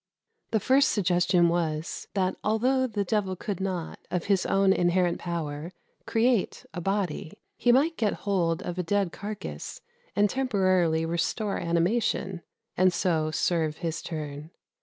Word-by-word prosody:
The 220 Hz, -, +2 dB
first 270 Hz, +7 st, +4 dB
suggestion 180 Hz, -3 st, +3 dB
was, 165 Hz, -1 st, -2 dB
that 185 Hz, -1 st, +1 dB
although 255 Hz, +5 st, +2 dB
the 210 Hz, -4 st, -1 dB
devil 195 Hz, -1 st, 0 dB
could 195 Hz, 0 st, -4 dB
not, 185 Hz, -4 st, -3 dB
of 180 Hz, -2 st, -1 dB
his 195 Hz, -2 st, +2 dB
own 195 Hz, 0 st, +4 dB
inherent 175 Hz, -1 st, +2 dB
power, 165 Hz, -1 st, -4 dB, 0.3 s
create 230 Hz, -2 st, +1 dB
a 175 Hz, -, -4 dB
body, 195 Hz, -4 st, -2 dB, 0.2 s
he 245 Hz, -, +3 dB
might 300 Hz, +7 st, +3 dB
get 215 Hz, -3 st, +1 dB
hold 180 Hz, -4 st, +1 dB
of 175 Hz, +1 st, -4 dB
a -, -, 0 dB
dead 195 Hz, 0 st, +1 dB
carcase 210 Hz, +3 st, -6 dB, 0.4 s
and 205 Hz, 0 st, +4 dB
temporarily 185 Hz, -10 st, +2 dB
restore 170 Hz, +5 st, -1 dB
animation, 180 Hz, +2 st, 0 dB, 0.3 s
and 185 Hz, 0 st, +4 dB
so 165 Hz, -3 st, +1 dB
serve 160 Hz, -1 st, 0 dB
his 165 Hz, -2 st, -3 dB
turn. 150 Hz, -1 st, -6 dB
185 Hz, 140 wpm, -27 LUFS, 170-205 Hz, 0.4 s, first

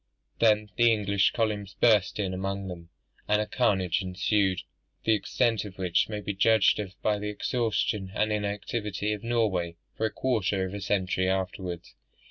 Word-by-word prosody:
Then 105 Hz, -2 st, +3 dB
the 120 Hz, 0 st, +5 dB
English 100 Hz, -2 st, +2 dB
columns 105 Hz, -3 st, -2 dB
burst 105 Hz, -5 st, +3 dB
in 95 Hz, -3 st, -1 dB
among 95 Hz, +1 st, -3 dB
them, 85 Hz, -1 st, -9 dB, 0.4 s
and 105 Hz, 0 st, +3 dB
a 105 Hz, -, 0 dB
carnage 95 Hz, -8 st, +1 dB
ensued, 95 Hz, 0 st, +1 dB, 0.4 s
the 110 Hz, -, +3 dB
extent 115 Hz, +2 st, +1 dB
of 100 Hz, -3 st, -10 dB
which 90 Hz, 0 st, +1 dB
may 105 Hz, -1 st, -4 dB
be 100 Hz, -, -3 dB
judged 110 Hz, +2 st, +4 dB
of 95 Hz, -2 st, -6 dB
by 105 Hz, -1 st, +1 dB
the 105 Hz, 0 st, -3 dB
exhaustion 105 Hz, -2 st, -1 dB
and 110 Hz, 0 st, +1 dB
inactivity 105 Hz, 0 st, -2 dB
of 105 Hz, 0 st, -6 dB
Norway 105 Hz, -8 st, 0 dB, 0.2 s
for 110 Hz, -, 0 dB
a -, -, -7 dB
quarter 105 Hz, -7 st, 0 dB
of 95 Hz, -, -6 dB
a 100 Hz, -, -5 dB
century 95 Hz, -1 st, 0 dB
afterwards. 95 Hz, -2 st, -3 dB
100 Hz, 165 wpm, -28 LUFS, 95-110 Hz, 0.4 s, the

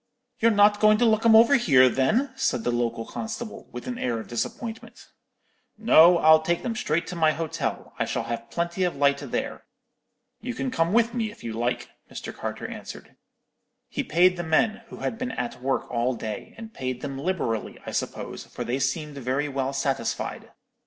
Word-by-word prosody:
"'You're 230 Hz, -, +5 dB
not 205 Hz, -1 st, +5 dB
going 215 Hz, 0 st, +5 dB
to 240 Hz, -, +3 dB
look 220 Hz, 0 st, +3 dB
'em 220 Hz, -, +7 dB
over 230 Hz, +5 st, +7 dB
here, 130 Hz, -, +5 dB
then?' 215 Hz, -, +1 dB
said 120 Hz, -, 0 dB
the 120 Hz, -, 0 dB
local 115 Hz, -1 st, -1 dB
constable, 220 Hz, 0 st, -6 dB
with -, -, -7 dB
an 250 Hz, -1 st, -4 dB
air 120 Hz, -2 st, -1 dB
of 110 Hz, -, -8 dB
disappointment. 225 Hz, -, -5 dB, 0.7 s
"'No, 180 Hz, -6 st, +7 dB
I'll 160 Hz, -1 st, +6 dB
take 170 Hz, +2 st, -1 dB
them 230 Hz, -2 st, -2 dB
straight 170 Hz, -8 st, 0 dB
to 180 Hz, -, -6 dB
my 160 Hz, -2 st, +3 dB
hotel; 160 Hz, -1 st, -4 dB
I -, -, +1 dB
shall -, -, -2 dB
have 115 Hz, 0 st, -5 dB
plenty 170 Hz, +2 st, -2 dB
of 180 Hz, -4 st, 0 dB
light 140 Hz, 0 st, +3 dB
there. -, -, -4 dB, 0.8 s
You 250 Hz, -1 st, -4 dB
can 260 Hz, 0 st, -2 dB
come 165 Hz, -6 st, +1 dB
with 230 Hz, +1 st, +3 dB
me, 225 Hz, -3 st, -1 dB
if 210 Hz, -, -14 dB
you 115 Hz, -, -4 dB
like,' 120 Hz, +2 st, -2 dB, 0.2 s
Mr. -, -, -7 dB
Carter -, -, -5 dB
answered. -, -, -9 dB, 0.7 s
"He -, -, -2 dB
paid 180 Hz, +3 st, +3 dB
the 175 Hz, -, -3 dB
men, 195 Hz, +7 st, +1 dB
who -, -, -10 dB
had 225 Hz, -, -3 dB
been 255 Hz, 0 st, -3 dB
at 125 Hz, 0 st, -4 dB
work 135 Hz, +1 st, 0 dB
all 120 Hz, +1 st, 0 dB
day, 110 Hz, -2 st, -6 dB
and 225 Hz, -1 st, -9 dB
paid 130 Hz, -1 st, -4 dB
them 135 Hz, -2 st, -5 dB
liberally, 140 Hz, -, -2 dB
I -, -, -5 dB
suppose, -, -, -4 dB
for -, -, -6 dB
they 125 Hz, +3 st, -2 dB
seemed 145 Hz, +2 st, -2 dB
very 135 Hz, +3 st, -1 dB
well 135 Hz, -1 st, -2 dB
satisfied. 135 Hz, 0 st, -2 dB
165 Hz, 195 wpm, -25 LUFS, -, 0.8 s, em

